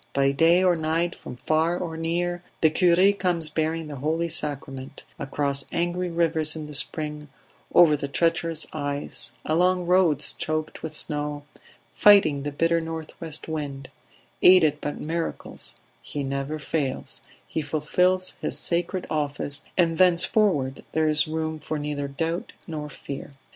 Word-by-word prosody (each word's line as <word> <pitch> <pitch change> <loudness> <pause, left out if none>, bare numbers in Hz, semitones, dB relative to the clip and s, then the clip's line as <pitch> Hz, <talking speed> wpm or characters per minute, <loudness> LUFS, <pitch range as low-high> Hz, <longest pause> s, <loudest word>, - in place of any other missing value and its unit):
By 140 0 +3
day 165 +6 +4
or 180 -2 +4
night, 165 +2 0
from 125 - -9
far 160 +6 +1
or 170 -3 -4
near, 175 +2 -1 0.2
the 160 - +5
cure 180 +3 +4
comes 175 -5 0
bearing 160 +1 -1
the 145 -2 -7
Holy 160 +5 -1
Sacrament 140 -4 -3 0.2
across 140 0 +1
angry 175 +1 -1
rivers 165 -2 +1
in 155 -1 -5
the 150 - -9
spring, 150 +1 -1 0.5
over 165 -4 +7
the 140 -1 -4
treacherous 165 +1 0
ice, 145 -1 -3
along 180 +3 +2
roads 170 -5 +3
choked 155 0 -3
with 160 -1 -5
snow, 150 -1 -3 0.5
fighting 195 -9 +6
the 145 +1 -3
bitter 165 +3 +1
north 160 -1 -6
west 160 -2 -5
wind; 145 -4 -5 0.5
aided 155 -5 +6
by 145 - -2
miracles, 165 +1 -5 0.3
he 145 - -5
never 140 +2 -3
fails; 140 -2 -3 0.3
he 160 - -2
fulfils 180 +5 +1
his - - -3
sacred 175 +2 -2
office, 145 -1 -1 0.2
and 165 -3 +2
thenceforward 175 -6 +3
there 160 -1 +2
is 150 0 +2
room 160 0 -3
for 155 +1 -4
neither 145 -1 -3
doubt 165 +5 -3
nor 150 -3 -5
fear. 140 0 -8
155 Hz, 145 wpm, -25 LUFS, 145-170 Hz, 0.5 s, over